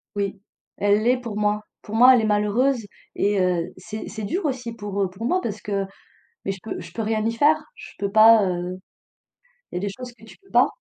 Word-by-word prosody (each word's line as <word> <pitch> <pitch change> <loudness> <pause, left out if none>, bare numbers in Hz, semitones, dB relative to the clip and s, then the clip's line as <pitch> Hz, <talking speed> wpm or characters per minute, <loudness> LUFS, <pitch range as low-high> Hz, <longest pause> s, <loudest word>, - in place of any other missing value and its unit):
Oui. 200 -1 -2 0.4
Elle 205 +1 +2
l'est 250 +2 +3
pour 230 -4 -6
moi. 210 0 +1 0.2
Pour 215 - -7
moi 250 +3 +8
elle 240 - +4
est - - 0
malheureuse 215 +4 +1 0.3
et 205 -1 +1
heu, 180 -1 0
c'est 215 0 -7
c'est 220 -1 -6
dur 350 - -2
aussi 250 -4 -2
pour, 205 -2 -4
heu, 190 - +1
pour 200 +5 -7
moi 365 +8 +2
parce 210 -1 -4
que 200 -1 -2 0.6
mais 195 - -1
je 195 - -8
peux 220 - -5
je - - -10
peux 225 - -3
rien 215 0 0
y 230 - +1
faire, 290 +7 +4 0.2
je - - -11
peux 200 -1 -2
pas 220 -1 +7
heu, 180 0 -3 0.9
il - - -6
y - - +1
a - - -5
des 205 - -1
choses 245 +4 -8
que 230 - -25
tu 220 - -14
peux 390 - -26
pas. - - +5
215 Hz, 240 wpm, -23 LUFS, 200-235 Hz, 0.9 s, moi